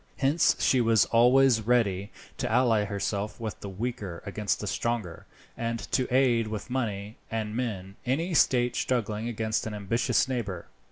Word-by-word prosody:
Hence 145 +4 +3
she 130 - +3
was 115 -2 +4
always 125 +1 +4
ready 105 -4 +1 0.3
to - - -2
ally 115 -5 +3
herself 100 +1 -3
with 110 -2 -5
the 100 - -7
weaker 100 -4 -5
against 100 -2 -1
the - - -5
stronger, 115 -8 -3 0.3
and 115 0 -2
to 130 -2 0
aid 125 -3 +3
with 110 +3 -6
money 105 -4 -3
and 110 -1 -3
men 100 -6 -4
any 160 +8 -1
state 125 -5 +3
struggling 115 -2 -1
against 110 -1 -1
an 105 - -5
ambitious 115 +5 +1
neighbour. 105 -9 -3
115 Hz, 155 wpm, -27 LUFS, 105-125 Hz, 0.3 s, was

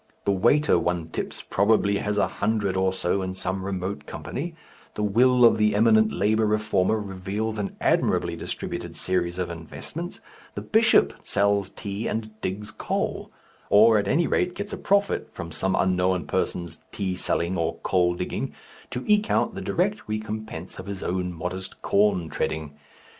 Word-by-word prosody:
The - - +3
waiter 120 +5 +3
one 85 -1 -1
tips - - -5
probably 100 0 +3
has 105 0 -2
a 100 - +3
hundred 100 -2 -1
or 95 0 +2
so 95 +1 0
in 95 0 -3
some 95 0 0
remote 95 0 -4
company, 165 +4 -5 0.4
the 105 - -2
will 125 +4 +5
of 115 - +5
the 105 -1 +3
eminent 110 0 +5
labour 110 +2 +2
reformer 105 -1 +1
reveals 105 +2 -3
an 100 - -3
admirably - - +1
distributed - - -5
series 90 -1 -1
of 90 -1 -2
investments, 80 -2 -7 0.4
the - - -4
bishop - - +4
sells 100 -1 +1
tea 100 +2 -5
and 110 -1 -4
digs 105 +3 -4
coal, - - -3 0.4
or 110 +1 +6
at 100 - -2
any 165 +3 +3
rate 180 +2 0
gets 200 +1 -5
a - - -3
profit 200 0 +1
from 85 -2 -7
some 95 +4 0
unknown 90 -3 +1
persons 85 +2 -2
tea 95 -3 -2
selling 90 0 0
or 85 -2 -1
coal 90 -2 +2
digging, 90 - -4 0.3
to 125 - -4
eke 210 0 +3
out 220 - +2
the 195 - -6
direct 195 +3 0
recompense 110 -5 -5
of 95 - -8
his 100 -1 -5
own 90 0 -1
modest 90 +3 -6
corn 100 -4 +2
treading. 80 -1 -3
100 Hz, 165 wpm, -25 LUFS, 90-110 Hz, 0.4 s, or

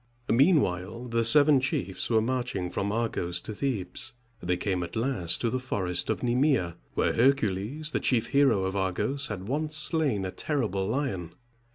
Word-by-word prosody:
Meanwhile 120 - +2
the 115 0 +1
seven 145 +4 +6
chiefs 100 -8 -2
were 110 -2 +3
marching 120 -7 -2
from 100 +1 -2
Argos 110 -6 -1
to 110 - -7
Thebes. 110 -1 -2 0.3
They 90 0 -1
came 95 -2 -2
at 85 -1 -6
last 115 -8 +1
to 115 - 0
the 130 - -1
forest 90 -8 -2
of - - -1
Ne´me 130 +4 +2
a, 85 -2 -5 0.2
where - - +1
Hercules, 130 - +1
the - - 0
chief 120 -3 +1
hero 140 -9 +3
of 95 +1 -2
Argos, 105 +9 0
had 95 -2 -6
once 150 +4 -2
slain 150 - +2
a 95 - -4
terrible 105 - -2
lion. 105 - -3
115 Hz, 170 wpm, -27 LUFS, 95-135 Hz, 0.3 s, seven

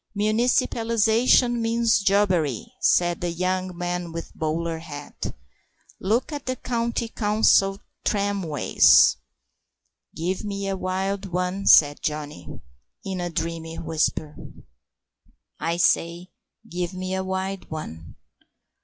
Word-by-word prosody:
"Municipalisation 230 +2 +2
means 230 -1 +2
jobbery," 185 - +1 0.2
said 175 -1 +2
the 175 - -1
young 185 +1 -2
man 175 -1 -3
with 165 0 -6
the - - -24
bowler 165 +1 -2
hat; 145 -3 -7 0.7
"look 225 +10 0
at 285 -2 -6
the 255 - -1
County 235 -1 -2
Council 210 -3 +2 0.2
tramways." 200 -7 +4 1.0
"Give 180 +3 -2
me 200 -1 -4
a 195 - -1
wild 190 +1 -2
one," 180 +2 -2
said 145 -1 +6
Johnny, 150 - -4 0.6
in 190 -2 -3
a 175 - -2
dreamy 165 0 -4
whisper; 155 -1 -1 1.2
"I 165 +2 -1
say, 175 +1 +1 0.4
give 175 0 -4
me 185 0 -4
a 190 0 -1
wild 190 +1 -4
one." 80 - -8
185 Hz, 110 wpm, -24 LUFS, 165-205 Hz, 1.2 s, said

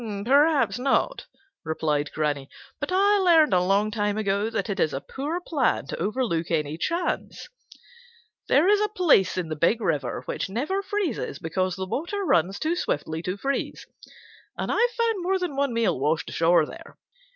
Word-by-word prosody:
"Perhaps 285 0 +3
not," 275 - 0 0.4
replied 150 -2 -1
Granny, 145 -3 -2 0.3
"but - - -4
I 400 +2 +4
learned 330 - +5
a 180 - +4
long 200 +3 +2
time 205 -1 -1
ago 205 0 0
that 220 -3 -2
it 200 -2 -3
is 155 - +1
a - - -2
poor 290 - -4
plan 295 -8 0
to - - -6
overlook 210 -8 -1
any 155 -2 -1
chance. 335 - -3 1.0
There 305 +6 +4
is 415 0 +4
a 425 - +2
place 330 - +3
in 175 -3 -2
the 155 - -3
Big 170 +9 +2
River 145 - -2
which - - -3
never 295 - -1
freezes 395 - -3
because 185 +1 -2
the 190 0 -4
water 345 - -3
runs 185 - +2
too 325 +2 -1
swiftly 160 - -2
to 180 +3 -4
freeze, 275 +6 -3 0.7
and - - -2
I've 475 +1 +2
found 455 -4 +1
more 380 +2 +1
than 360 -6 -3
one 280 -1 0
meal 230 - 0
washed 155 +4 0
ashore 165 -1 +3
there. - - -12
220 Hz, 175 wpm, -25 LUFS, -, 1.0 s, learned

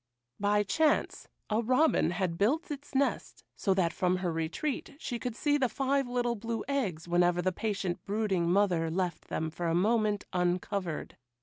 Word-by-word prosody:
By 205 +1 +3
chance 300 +10 +1 0.2
a 215 +2 +2
robin 255 - +3
had 175 -1 -2
built 300 - +1
its 285 -1 -7
nest 275 +1 0
so 195 -3 +1
that 175 -3 +1
from 180 0 +1
her 180 -2 -1
retreat 165 - -3
she 245 -5 -4
could 245 -2 -4
see 290 +2 +1
the 255 -3 +2
five 275 +1 0
little 245 -1 0
blue 230 +1 -4
eggs 200 - -2
whenever 175 0 +3
the 185 +1 +1
patient 195 -3 -2
brooding 200 -5 0
mother 180 -4 +2
left 175 -1 -2
them 160 0 -3
for 170 +1 -3
a 165 - +1
moment 210 +2 +2
uncovered. 180 -1 -1
200 Hz, 170 wpm, -30 LUFS, 175-245 Hz, 0.2 s, By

